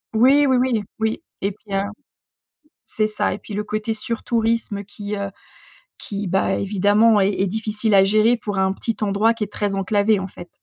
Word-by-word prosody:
Oui 275 +5 +5
oui 260 - +3
oui 245 -4 +1
oui 220 +4 -1 0.2
et 200 - 0
puis 210 +1 -16
un 195 +1 +1 1.0
c'est 215 -1 -1
ça 210 -2 -1
et 190 - -5
puis 210 - -10
le 210 +1 -2
côté 215 +1 -2
sur 225 +1 -4
tourisme 225 -3 0
qui, 205 +1 -6
heu, 200 -1 -3 0.7
qui, 200 -1 -4
bah, 190 +2 +1
évidemment 205 +3 +3
est 195 0 +3
est 195 - +2
difficile 215 +1 -1
à 195 -1 +6
gérer 215 +4 +3
pour 205 -2 -4
un 190 0 +2
petit 225 +3 -3
endroit 210 +2 +2
qui 230 -2 -3
est 205 - -6
très 205 -1 -1
enclavé 205 +2 +2
en 190 - -4
fait. 175 -2 -12
210 Hz, 200 wpm, -21 LUFS, 200-225 Hz, 1.0 s, à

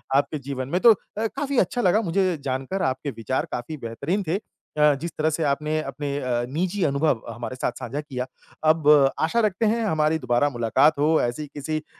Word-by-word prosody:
आपके 145 +2 +1
जीवन 135 -1 -5
में 175 - +1
तो 235 - +9
अ, 215 +2 -5
काफ़ी 280 +4 -3
अच्छा 245 - +1
लगा 195 +2 +3
मुझे 185 -2 +1
जानकर 135 +8 -2
आपके 130 +2 -1
विचार 115 +2 -2
काफ़ी 140 +6 -4
बेहतरीन 140 - -3
थे। 165 - +1
अ, 150 -7 0
जिस 170 +1 -4
तरह 155 0 +2
से 160 +1 -1
आपने 150 +2 0
अपने 140 0 -4
अ, 120 -3 -1
निजी 180 +7 -1
अनुभव 140 -4 +1
हमारे 120 +2 -6
साथ 130 - -1
साझा 130 +3 -4
किया, 130 -4 -4 0.4
अब 155 -1 +3 0.3
आशा 165 +9 +1
रखते 205 +3 -1
हैं 230 +2 +1
हमारी 155 -4 +2
दोबारा 125 +2 +2
मुलाकात 135 +4 +2
हो 155 +2 +3
ऐसी 120 +5 -2
किसी 150 +2 -4
अ, 155 - -18
150 Hz, 195 wpm, -24 LUFS, 130-170 Hz, 0.4 s, तो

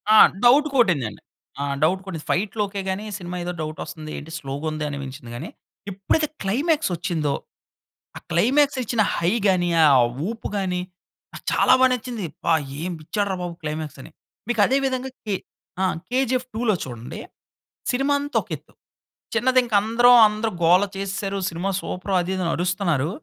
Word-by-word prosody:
ఆ! - - +8 0.3
డౌట్ 285 +5 +6
కొటిందండి, 155 - +2 0.4
ఆ! - - 0 0.2
డౌట్ 185 +4 +2
కొట్టింది. 165 -5 -6
ఫైట్‌లు 205 +3 0
ఓకె 200 0 -5
గాని, 190 +3 -3
సినిమా 180 -2 -6
ఏదో 180 +1 -3
డౌటోస్తుంది, 155 0 -6
ఏంటి 155 +2 -9
స్లోగా 140 +1 -5
ఉంది 155 0 -4
అనిపించింది 140 -3 -7
కానీ, - - -6 0.4
ఎప్పుడైతే 200 +11 0 0.2
క్లైమాక్స్ 285 - +1
వచ్చిందో, 160 -4 -1 0.8
ఆ - - -6
క్లైమాక్స్ 265 +10 +3
ఇచ్చిన 230 0 0 0.2
హై 170 +1 +1 0.2
గాని, 175 -2 +2 0.2
ఆ - - +7 0.4
ఊపు 225 +1 -4
గాని 180 -2 -1 0.5
నాకు - - -10
చాలా - - +5
బాగా 260 0 +6
నచ్చింది. 235 -4 -4
"అబ్బా! 170 - 0 0.2
ఏ - - -6 0.2
ఇచ్చాడు 205 +5 -1
రా 190 - -1
బాబు 175 -1 -4
క్లైమాక్స్" 150 -2 -4
అని. - - -11 0.4
మీకు 240 -3 -1
అదే 265 +5 +2
విధంగా 260 0 -1 0.2
కే 205 -3 0 0.5
ఆ! - - +2 0.3
కేజీఎఫ్ 255 0 0
2లో 225 -2 +2
చూడండి. 120 -2 -7 0.7
సినిమా 270 +3 +1
అంతా 290 +1 -2
ఒక - - -18
ఎత్తు. - - -17 0.6
చిన్నది, 255 +2 +3
ఇంకా 230 -4 +1
అందరం 240 +3 +5
అందరు 215 +1 -2
గోల 180 +4 +6
చేసేసారు, 195 0 -3
సినిమా 175 +4 -2
సూపర్ 185 +1 -5
అది 180 +2 -2
ఇది 185 - -2
అని 170 - 0
అరుస్తున్నారు. 175 -5 0
195 Hz, 165 wpm, -23 LUFS, 165-240 Hz, 0.8 s, ఆ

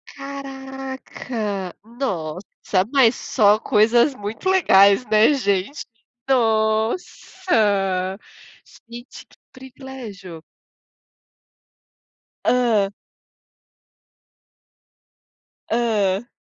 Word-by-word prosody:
Caraca, 265 -7 -6
nossa, 190 - -3
mas 260 -5 +5
só 210 -2 +2
coisas 235 +6 +3
muito 210 - -4
legais, 200 - +5
né, 215 +6 +4
gente. 205 +1 -1 0.4
Nossa, 220 - 0 0.7
gente 240 +2 -11
que - - -24
privilégio. 245 - -11 2.0
Hã. 230 -5 +2 2.8
Hã. 220 -3 0
225 Hz, 55 wpm, -21 LUFS, 200-265 Hz, 2.8 s, mas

